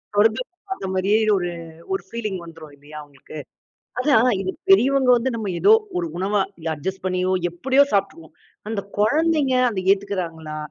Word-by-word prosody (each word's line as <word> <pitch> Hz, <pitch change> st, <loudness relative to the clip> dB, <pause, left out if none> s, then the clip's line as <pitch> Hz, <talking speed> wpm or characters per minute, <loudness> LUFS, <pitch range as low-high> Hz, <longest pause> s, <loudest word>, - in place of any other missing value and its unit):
சொர்க்கத்துக்கு 360 Hz, -, 0 dB
வந்த 190 Hz, -, -6 dB
மாரியே 195 Hz, +3 st, +2 dB, 0.2 s
ஒரு 175 Hz, -1 st, -2 dB, 0.4 s
ஒரு 190 Hz, -, -1 dB
ஃபீலிங் 215 Hz, -5 st, -4 dB
வந்துரும் 160 Hz, -3 st, -12 dB
இல்லையா 150 Hz, +2 st, -13 dB
அவுங்களுக்கு. 145 Hz, +1 st, -13 dB, 0.6 s
அதான் 255 Hz, -3 st, +4 dB
இது 190 Hz, -, -2 dB, 0.2 s
பெரியவங்க 275 Hz, -7 st, +4 dB
வந்து 255 Hz, +2 st, -1 dB
நம்ம 210 Hz, -4 st, -3 dB
ஏதோ 425 Hz, -, +6 dB, 0.2 s
ஒரு 350 Hz, -2 st, -1 dB
உணவா 200 Hz, +2 st, 0 dB, 0.3 s
அட்ஜஸ்ட் 190 Hz, +5 st, -5 dB
பண்ணியோ 185 Hz, 0 st, 0 dB, 0.2 s
எப்படியோ 260 Hz, +11 st, +3 dB
சாப்பிட்ருவோம். 190 Hz, -6 st, -2 dB, 0.4 s
அந்தக் 200 Hz, -2 st, -5 dB
கொழந்தைங்க 300 Hz, +3 st, +2 dB, 0.2 s
அத 190 Hz, -4 st, -3 dB
ஏத்துக்குறாங்களா? 170 Hz, -6 st, -5 dB
200 Hz, 140 wpm, -22 LUFS, 175-260 Hz, 0.6 s, ஏதோ